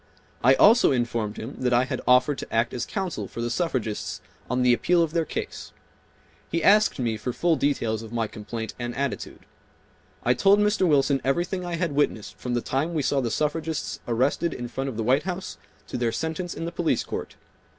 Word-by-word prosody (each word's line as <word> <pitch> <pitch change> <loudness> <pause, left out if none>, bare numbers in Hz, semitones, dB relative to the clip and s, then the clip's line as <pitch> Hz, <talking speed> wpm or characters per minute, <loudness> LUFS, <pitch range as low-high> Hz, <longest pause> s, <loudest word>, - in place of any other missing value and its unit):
I 130 +3 +6
also 220 - +6
informed 115 -4 -1
him 115 +6 -7
that 125 -1 +1
I 120 +1 +4
had 130 - -3
offered 125 +3 +4
to - - -7
act 115 +1 +1
as 125 - -3
counsel 190 -4 -3
for - - -9
the 120 0 -1
suffragists 125 -8 -2 0.3
on 125 0 +1
the 125 -1 +5
appeal 170 +7 +3
of 160 - -2
their 165 -1 +1
case. - - -6 0.8
He 165 -1 -1
asked 210 +1 +5
me 115 -4 -1
for 115 +4 -3
full 170 +6 +2
details 115 -7 0
of 115 -1 -10
my 115 -1 0
complaint 110 +1 -6
and 120 0 -4
attitude. 140 0 -4 0.8
I 125 - +4
told 195 +11 +5
Mr. 210 -2 +2
Wilson 140 -2 +3
everything 175 +6 0
I 175 -1 -3
had 170 -2 -1
witnessed 140 -7 -1
from 125 -1 -2
the 120 - 0
time 150 +9 -1
we 150 - 0
saw 140 0 +1
the 120 - -1
suffragists 155 +4 -2
arrested 130 +8 +1
in 120 -1 -5
front 135 +2 -3
of 120 - -7
the 115 - -1
White 130 +5 +3
House 180 - -5 0.3
to - - -3
their 120 -2 +1
sentence 160 +7 -3
in 165 - -4
the 170 - -3
police 170 -1 0
court. - - -6
135 Hz, 205 wpm, -25 LUFS, 120-165 Hz, 0.8 s, I